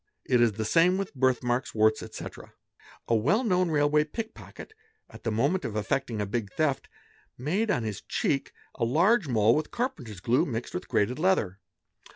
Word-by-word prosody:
It 125 Hz, -2 st, +3 dB
is 115 Hz, -3 st, +4 dB
the 110 Hz, +2 st, -3 dB
same 170 Hz, -, +4 dB
with 195 Hz, -1 st, -4 dB
birthmarks, 130 Hz, -1 st, 0 dB
warts, 110 Hz, 0 st, +3 dB
etc. -, -, -9 dB, 0.5 s
A -, -, +1 dB
well 145 Hz, -, +2 dB
known 185 Hz, -5 st, +2 dB
railway 150 Hz, 0 st, +3 dB
pick 220 Hz, +9 st, -6 dB
pocket, 435 Hz, -, -12 dB, 0.4 s
at -, -, -12 dB
the 115 Hz, -, -2 dB
moment 140 Hz, +12 st, +1 dB
of 105 Hz, -, -4 dB
effecting 115 Hz, +2 st, -1 dB
a 105 Hz, -, 0 dB
big 100 Hz, 0 st, -3 dB
theft, 140 Hz, -4 st, -1 dB, 0.5 s
made 185 Hz, -, -1 dB
on 175 Hz, -, +1 dB
his 105 Hz, -3 st, -4 dB
cheek 135 Hz, -1 st, -1 dB, 0.2 s
a 120 Hz, -, -3 dB
large 175 Hz, -, +3 dB
mole 110 Hz, -3 st, +4 dB
with 155 Hz, -, -1 dB
carpenter's 130 Hz, -, -4 dB
glue 115 Hz, +7 st, +2 dB
mixed 120 Hz, -3 st, -4 dB
with 180 Hz, -, -5 dB
grated 125 Hz, +7 st, 0 dB
leather. 135 Hz, -, +1 dB
130 Hz, 180 wpm, -27 LUFS, 115-180 Hz, 0.5 s, is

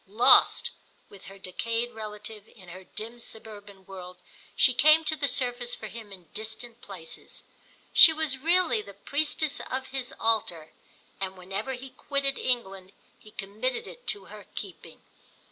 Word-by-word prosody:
Lost, 215 Hz, +5 st, +6 dB, 0.4 s
with 200 Hz, -, -14 dB
her 195 Hz, +1 st, -11 dB
decayed 230 Hz, +6 st, -2 dB
relative, 215 Hz, -1 st, -8 dB
in 185 Hz, -5 st, -16 dB
her 185 Hz, +2 st, -9 dB
dim 230 Hz, +5 st, -7 dB
suburban 205 Hz, -4 st, -8 dB
world, 180 Hz, -1 st, -9 dB, 0.4 s
she 255 Hz, -, +5 dB
came 310 Hz, +5 st, +6 dB
to 315 Hz, -, +1 dB
the 285 Hz, -1 st, 0 dB
surface 245 Hz, -2 st, 0 dB
for -, -, -8 dB
him 220 Hz, 0 st, -9 dB
in 185 Hz, -3 st, -11 dB
distant 225 Hz, +2 st, -7 dB
places. 180 Hz, -5 st, -10 dB, 0.5 s
She 325 Hz, -, +11 dB
was 310 Hz, -4 st, -1 dB
really 335 Hz, -4 st, +3 dB
the 200 Hz, -2 st, -12 dB
priestess 295 Hz, +5 st, +1 dB
of 260 Hz, +1 st, -3 dB
his 265 Hz, -2 st, -2 dB
altar, 200 Hz, -8 st, 0 dB, 0.5 s
and 190 Hz, -1 st, -3 dB
whenever 195 Hz, +8 st, -4 dB
he 260 Hz, +1 st, -8 dB
quitted 275 Hz, +1 st, -1 dB
England 195 Hz, -6 st, -1 dB, 0.3 s
he 215 Hz, -, -15 dB
committed 215 Hz, +5 st, -3 dB
it -, -, -12 dB
to 420 Hz, -, -2 dB
her -, -, -12 dB
keeping. -, -, -8 dB
225 Hz, 150 wpm, -28 LUFS, 195-265 Hz, 0.5 s, She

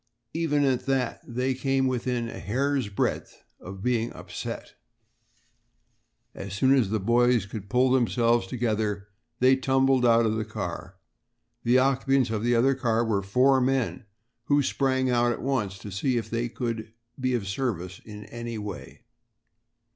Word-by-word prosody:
Even 150 Hz, -3 st, +1 dB
at 130 Hz, -1 st, 0 dB
that 130 Hz, -3 st, 0 dB
they 125 Hz, +2 st, -1 dB
had 130 Hz, -, -12 dB
come 135 Hz, -1 st, +1 dB
within 125 Hz, -1 st, -1 dB
a -, -, -7 dB
hair's 130 Hz, +3 st, -1 dB
breadth 100 Hz, -, -3 dB, 0.2 s
of 95 Hz, +1 st, -9 dB
being 120 Hz, -2 st, 0 dB
upset. -, -, -7 dB, 1.6 s
As 95 Hz, -1 st, -7 dB
soon 130 Hz, +6 st, +4 dB
as 125 Hz, -8 st, +3 dB
the 110 Hz, +1 st, 0 dB
boys 120 Hz, +1 st, +3 dB
could 100 Hz, -1 st, -8 dB
pull 125 Hz, +2 st, +3 dB
themselves 120 Hz, -3 st, +2 dB
together, 105 Hz, -3 st, -2 dB, 0.3 s
they 130 Hz, +1 st, +6 dB
tumbled 135 Hz, -1 st, +2 dB
out 115 Hz, -1 st, +5 dB
of 110 Hz, 0 st, 0 dB
the 110 Hz, -, -1 dB
car. 95 Hz, -4 st, -6 dB, 0.7 s
The 120 Hz, +2 st, +4 dB
occupants 135 Hz, -1 st, +2 dB
of 110 Hz, -1 st, -2 dB
the 120 Hz, 0 st, +2 dB
other 130 Hz, +4 st, +4 dB
car 120 Hz, -3 st, 0 dB
were 105 Hz, -3 st, 0 dB
four 130 Hz, +7 st, +3 dB
men, 130 Hz, -3 st, 0 dB, 0.4 s
who 145 Hz, 0 st, +3 dB
sprang 130 Hz, -1 st, +1 dB
out 120 Hz, 0 st, +3 dB
at -, -, -7 dB
once 110 Hz, -8 st, -1 dB
to 100 Hz, -, -9 dB
see 120 Hz, +6 st, 0 dB
if 110 Hz, -2 st, -4 dB
they 120 Hz, +1 st, -1 dB
could 115 Hz, -3 st, -4 dB, 0.3 s
be 130 Hz, -1 st, 0 dB
of 105 Hz, -5 st, -3 dB
service 95 Hz, -5 st, -3 dB
in 105 Hz, -1 st, -10 dB
any 115 Hz, +1 st, -6 dB
way. 105 Hz, -1 st, -8 dB
120 Hz, 160 wpm, -26 LUFS, 110-130 Hz, 1.6 s, they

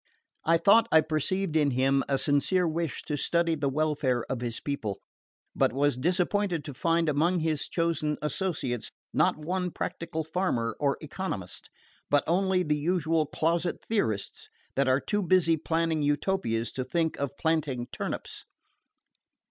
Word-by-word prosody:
I 165 Hz, +1 st, +5 dB
thought 215 Hz, +7 st, +5 dB
I 160 Hz, -, +7 dB
perceived 160 Hz, +3 st, -1 dB
in 150 Hz, -2 st, +4 dB
him 135 Hz, +1 st, +2 dB
a 135 Hz, -, +2 dB
sincere 160 Hz, +6 st, +2 dB
wish 165 Hz, -1 st, -2 dB
to 150 Hz, -, -3 dB
study 170 Hz, +3 st, +1 dB
the 145 Hz, -3 st, 0 dB
welfare 140 Hz, -4 st, 0 dB
of 130 Hz, -2 st, -2 dB
his 120 Hz, -2 st, -3 dB
people; 115 Hz, -9 st, -3 dB, 0.6 s
but -, -, +3 dB
was 145 Hz, 0 st, +2 dB
disappointed 180 Hz, +3 st, 0 dB
to 145 Hz, -, -6 dB
find 165 Hz, +4 st, +1 dB
among 165 Hz, +4 st, +2 dB
his 155 Hz, -2 st, 0 dB
chosen 165 Hz, -3 st, 0 dB
associates 150 Hz, -, -2 dB, 0.2 s
not -, -, +3 dB
one 180 Hz, +4 st, -2 dB
practical 165 Hz, -1 st, -4 dB
farmer 155 Hz, -9 st, -1 dB
or 140 Hz, -2 st, +1 dB
economist, 155 Hz, -, -5 dB, 0.4 s
but 145 Hz, 0 st, +3 dB
only 185 Hz, +2 st, +2 dB
the 150 Hz, -3 st, 0 dB
usual 160 Hz, -1 st, +1 dB
closet 170 Hz, +3 st, 0 dB
theorists 110 Hz, -, -2 dB, 0.3 s
that 140 Hz, 0 st, +2 dB
are 130 Hz, +1 st, +4 dB
too 205 Hz, +7 st, -1 dB
busy 180 Hz, -3 st, +3 dB
planning 160 Hz, 0 st, 0 dB
Utopias 145 Hz, -, 0 dB
to 130 Hz, -, -3 dB
think 160 Hz, +5 st, -1 dB
of 140 Hz, 0 st, -3 dB
planting 150 Hz, -7 st, 0 dB
turnips. -, -, -5 dB
155 Hz, 150 wpm, -28 LUFS, 140-170 Hz, 0.6 s, I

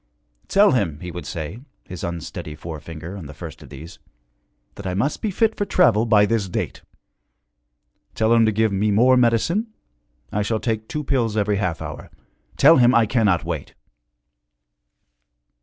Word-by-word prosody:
'Tell 205 Hz, +1 st, +5 dB
him,' 95 Hz, -, 0 dB
he 90 Hz, -, -6 dB
would 85 Hz, -4 st, -7 dB
say, 80 Hz, -, -5 dB, 0.2 s
his 90 Hz, -2 st, -9 dB
unsteady 85 Hz, -2 st, -6 dB
forefinger 80 Hz, +2 st, -8 dB
on 90 Hz, -7 st, -8 dB
the 75 Hz, -, -11 dB
first -, -, -9 dB
of -, -, -13 dB
these, 85 Hz, +3 st, -11 dB, 0.7 s
'that 100 Hz, -, -8 dB
I 90 Hz, -, -2 dB
must 135 Hz, +10 st, -1 dB
be 215 Hz, -, -1 dB
fit 220 Hz, +3 st, +1 dB
for -, -, -1 dB
travel 115 Hz, -, +3 dB
by 105 Hz, -2 st, +5 dB
this 105 Hz, -3 st, -1 dB
date. -, -, -4 dB, 1.3 s
Tell 110 Hz, +1 st, +2 dB
him 115 Hz, -1 st, +5 dB
to -, -, +3 dB
give 110 Hz, 0 st, +1 dB
me 100 Hz, +2 st, 0 dB
more 120 Hz, +5 st, +4 dB
medicine 125 Hz, -, +2 dB, 0.6 s
I 105 Hz, -, -1 dB
shall 110 Hz, +2 st, -1 dB
take 110 Hz, -1 st, -2 dB
two 150 Hz, -, -4 dB
pills 120 Hz, -6 st, 0 dB
every 105 Hz, -1 st, +1 dB
half 90 Hz, -4 st, -2 dB
hour. -, -, -8 dB, 0.5 s
Tell 160 Hz, +4 st, +7 dB
him 125 Hz, 0 st, +5 dB
I 115 Hz, -1 st, +5 dB
cannot 105 Hz, -6 st, +1 dB
wait.' -, -, -5 dB
105 Hz, 165 wpm, -22 LUFS, 90-120 Hz, 1.3 s, Tell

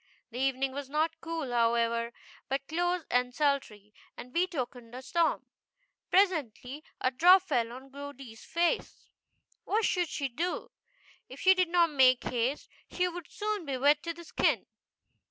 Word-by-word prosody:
The 240 Hz, -, -6 dB
evening 270 Hz, 0 st, 0 dB
was 275 Hz, 0 st, -6 dB
not 320 Hz, +2 st, -1 dB
cool, 325 Hz, -5 st, -4 dB
however, 235 Hz, 0 st, +1 dB, 0.4 s
but 275 Hz, +1 st, -2 dB
close 350 Hz, +1 st, -1 dB
and 250 Hz, 0 st, +1 dB
sultry, 245 Hz, -9 st, -1 dB, 0.2 s
and 250 Hz, +1 st, -10 dB
betokened 255 Hz, -9 st, -2 dB
a 255 Hz, -, -6 dB
storm. 335 Hz, +5 st, +1 dB, 0.6 s
Pres 385 Hz, 0 st, +5 dB
ently 275 Hz, -, -6 dB, 0.2 s
a 255 Hz, -, +1 dB
drop 355 Hz, +8 st, +6 dB
fell 235 Hz, -10 st, 0 dB
on 265 Hz, +2 st, -11 dB
Goody's 275 Hz, -5 st, -10 dB
face. 345 Hz, +8 st, -1 dB, 0.5 s
What 430 Hz, +1 st, +1 dB
should 355 Hz, -3 st, +1 dB
she 280 Hz, -, -2 dB
do? 335 Hz, +8 st, -3 dB, 0.6 s
If -, -, -10 dB
she 375 Hz, -, +7 dB
did 365 Hz, -2 st, +1 dB
not 340 Hz, -2 st, +3 dB
make 255 Hz, -3 st, +5 dB
haste 245 Hz, +4 st, -1 dB, 0.2 s
she 360 Hz, 0 st, 0 dB
would 355 Hz, -1 st, -7 dB
soon 425 Hz, -2 st, -3 dB
be 275 Hz, -4 st, -3 dB
wet 290 Hz, +3 st, +4 dB
to 335 Hz, -, -3 dB
the 340 Hz, -, -10 dB
skin. -, -, +1 dB
285 Hz, 155 wpm, -30 LUFS, 250-340 Hz, 0.6 s, she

